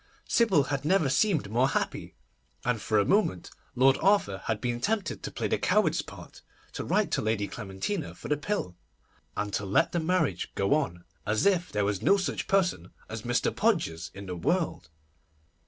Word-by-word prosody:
Sybil 195 -11 +4
had 140 0 -3
never 160 -2 +3
seemed 135 - +1
more 125 +4 +3
happy, - - -3 0.5
and 120 -3 0
for 110 - +1
a 100 - +4
moment 195 - +1 0.2
Lord 135 +2 +4
Arthur 190 - +3
had 110 -2 -1
been 120 -1 -2
tempted 205 - -1
to - - -4
play - - -2
the - - 0
coward's - - +2
part, - - -12 0.3
to - - -4
write - - +1
to - - +1
Lady 110 -2 0
Clementina 115 - -4
for - - -9
the 150 - +2
pill, 145 - -3 0.6
and 105 -1 -2
to 100 - -1
let 100 +1 +2
the 175 - 0
marriage 160 - 0
go 100 +7 +2
on 130 - -1 0.2
as 105 +1 0
if 185 -3 +2
there 105 -1 0
was 100 -2 -1
no 200 - +4
such 190 - -2
person 180 - +1 0.2
as 110 0 -5
Mr. 120 +1 0
Podgers 165 - 0
in 100 0 -8
the 90 -1 -5
world. 165 - -1
130 Hz, 185 wpm, -28 LUFS, -, 0.6 s, Sybil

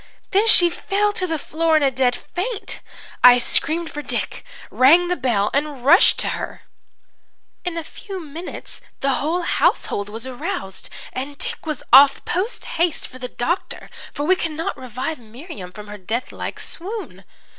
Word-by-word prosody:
"Then 415 +3 +3
she 350 -5 +7
fell 410 +3 0
to 370 -2 -2
the 325 -2 -1
floor 320 +2 +1
in 305 - +2
a 275 - +3
dead 250 -1 +2 0.2
faint. 410 +4 -3 0.4
"I 245 0 +10
screamed 320 +6 +1
for 295 - -5
Dick, - - -3 0.3
rang 335 +7 +5
the 360 - +1
bell 235 - 0
and 280 -3 -2
rushed 345 +8 +7
to - - -1
her. - - -5 1.0
"In 355 -2 -3
a 330 - -3
few 385 +4 -8
minutes 330 +2 -8 0.2
the 275 - +2
whole 325 +7 -1
household 205 -10 +1
was 225 +3 -6
aroused, 260 - -5 0.2
and 275 +3 -5
Dick 470 -5 -4
was 305 -4 -3
off 275 +1 +8
posthaste 355 -4 -1
for 255 - -13
the 250 - -4
doctor, 325 +9 -3 0.2
for 290 - -4
we 370 +5 +4
could 330 -3 -3
not 325 +2 -3
revive 255 +5 -5
Miriam 230 - -10
from 210 +2 -10
her 210 0 -9
death 220 +7 -3
like - - -6
swoon. 410 +5 -6
305 Hz, 165 wpm, -21 LUFS, 255-355 Hz, 1.0 s, I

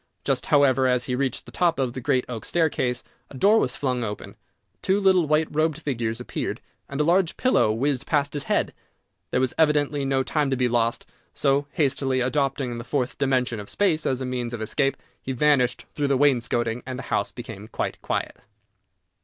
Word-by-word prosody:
Just, - - 0
however, 135 -2 +4
as 125 -1 +2
he 125 - -3
reached 130 0 -1
the - - -12
top 175 -2 +1
of 130 -3 -1
the 130 - -5
great 130 -1 +1
oak 115 -3 -6
staircase, 140 -7 0 0.3
a 135 - -10
door 210 - +5
was 125 - -1
flung 125 -3 -1
open, 105 -2 -6 0.5
two 190 +2 +2
little 190 -4 +4
white 155 +1 +2
robed 155 0 0
figures 120 -7 -2
appeared, 125 - -4 0.3
and 140 - -5
a - - +4
large 175 +2 +2
pillow 255 - +3
whizzed 130 +4 -1
past 145 -2 +1
his 145 -2 -3
head! - - 0 0.6
There - - +1
was 130 -1 +1
evidently 150 -2 +2
no 135 -1 +1
time 150 0 0
to 135 - +1
be 125 0 +2
lost, 115 -1 0 0.3
so, 140 +1 +1
hastily 135 -3 +1
adopting 130 -2 -1
the - - -6
Fourth 125 0 -2
dimension 130 -4 +1
of 105 - -8
Space 175 -6 +1
as 130 0 0
a - - -2
means 125 -2 -3
of 115 - -7
escape, 135 +5 0 0.2
he 130 - -4
vanished 130 -2 +2
through 145 -1 -1
the 140 -1 +2
wainscoting, 120 -4 +1
and 130 -1 -6
the 135 - -6
house - - 0
became 110 -4 -9
quite - - -4
quiet. - - -3
135 Hz, 195 wpm, -24 LUFS, 125-145 Hz, 0.6 s, door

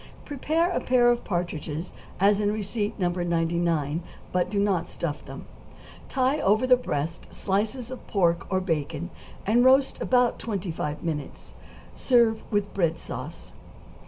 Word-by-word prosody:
= - - -20
Prepare 315 +5 0
a - - 0
pair 245 -1 +4
of 240 - -1
partridges 170 -2 -3 0.3
as 200 +2 +4
in 205 0 +2
receipt 210 0 -2
No. 180 -3 +1
99, 170 -3 0 0.3
but 180 -1 +1
do 205 - -1
not 195 -4 +1
stuff 155 -3 -4
them; - - -9 0.6
tie 265 +3 +1
over 215 +5 +3
the 255 0 +7
breasts 165 - -4
slices 220 +5 -1
of 255 - -9
pork 170 -4 +1
or 185 - +2
bacon, 160 -1 -2 0.3
and 235 +4 +4
roast 265 +1 +4
about 250 -1 +2
twenty 200 -5 -3
five 150 -2 -4
minutes; 155 -4 -5 0.4
serve 235 -3 +3
with 205 -1 0
bread 170 -4 +1
sauce. - - -8
195 Hz, 150 wpm, -26 LUFS, 170-240 Hz, 0.6 s, the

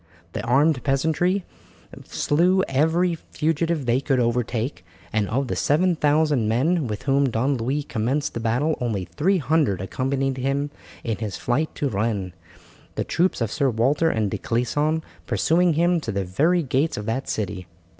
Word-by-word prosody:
The - - -4
armed 135 +3 +2
peasantry 160 +7 +1 0.6
slew 180 +5 +2
every 160 +6 +2
fugitive 160 -1 -1
they 120 +2 +2
could 135 -2 +1
overtake, 120 +1 -1 0.3
and 105 -2 0
of 130 +4 0
the - - -2
7000 150 -5 +2
men 145 +6 +1
with 105 -2 -5
whom 140 -1 +2
Don 125 +5 0
Louis 135 +6 -1
commenced 135 +4 -1
the - - -3
battle 125 +8 +1
only 110 -6 -1
300 150 - +1
accompanied 135 +7 -1
him 140 +2 -1 0.3
in 115 -3 -2
his 105 -4 -4
flight 145 +6 0
to 145 - -1
Rennes, 100 -4 -2 0.6
the - - -1
troops 180 -5 0
of 115 -2 0
Sir 140 -2 +1
Walter 135 +8 +2
and 110 -8 0
de - - -3
Clisson 145 +7 0 0.2
pursuing 175 +1 +2
him 170 +2 +2
to 115 - -3
the 100 -1 -2
very 160 - +2
gates 140 +4 0
of 105 - -5
that 125 +5 -2
city. 95 -3 -3
135 Hz, 155 wpm, -23 LUFS, 115-160 Hz, 0.6 s, armed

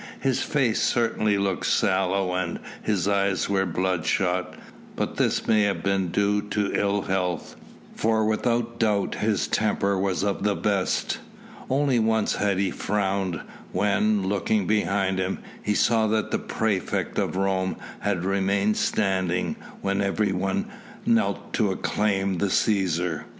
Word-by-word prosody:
His 135 -2 0
face 130 -7 +1
certainly 110 -3 +1
looked 100 -2 -1
sallow 95 0 +1
and 90 -2 -2 0.2
his 100 -3 0
eyes 100 -2 +1
were 95 -1 +1
bloodshot, 90 +1 0 0.4
but - - -3
this - - +1
may 110 -1 +4
have 100 -1 0
been 95 -1 +1
due 100 +3 +1
to 105 0 -2
ill 100 -1 +1
health, 90 -3 -2 0.4
for 110 0 +1
without 115 +2 0
doubt 105 -3 +1
his 105 -1 0
temper 100 -2 +1
was 95 -1 0
of 100 -1 -1
the 105 0 +1
best. 100 -3 0 0.5
Only 135 -2 +2
once 110 -1 +1
had 100 -2 +1
he 95 -1 +1
frowned, 95 -4 -1 0.3
when, 105 -1 +2
looking 100 0 +1
behind 100 -2 +1
him, 95 0 -1 0.2
he 105 - 0
saw 110 0 +3
that 110 0 0
the - - +1
praefect 105 -5 -1
of - - -1
Rome 95 -1 0 0.2
had 95 -4 -1
remained 100 +2 +1
standing 95 -4 0 0.3
when 100 0 0
everyone 100 - 0 0.4
knelt 230 -1 +1
to 110 -4 +2
acclaim 95 -1 0
the 100 - +1
Cæsar. 90 -5 +1
100 Hz, 140 wpm, -25 LUFS, 95-105 Hz, 0.5 s, may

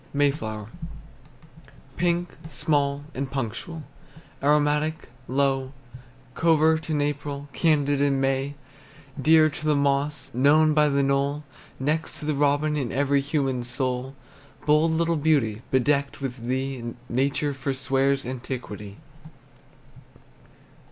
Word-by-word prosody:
MAY 145 0 +4
FLOWER. 110 -6 -6 1.3
Pink, 175 0 0
small, 145 -3 0
and 135 0 -3
punctual, 140 +5 -4 0.6
Aromatic, 150 +2 +1 0.2
low, 135 0 0 0.6
Covert 160 0 +3
in 155 -2 +1
April, 145 0 -3
Candid 145 -3 +2
in 140 -1 +2
May, 135 +1 0 0.7
Dear 155 +2 +6
to 150 - -8
the 155 -1 +2
moss, 140 +1 0
Known 150 +5 +4
by 150 0 +4
the 140 0 +2
knoll, 140 +2 0 0.4
Next 155 +4 -1
to - - -7
the 155 - +1
robin 145 +1 +2
In 135 -5 -2
every 140 +1 +2
human 135 -3 -1
soul. 125 +1 -2 0.5
Bold 150 +2 +4
little 165 0 +1
beauty, 140 -8 +1
Bedecked 140 +2 +1
with 130 -3 -5
thee, 130 0 -2 0.2
Nature 140 +3 0
forswears 135 0 0
Antiquity. 120 -5 -6
140 Hz, 110 wpm, -25 LUFS, 135-150 Hz, 1.3 s, Dear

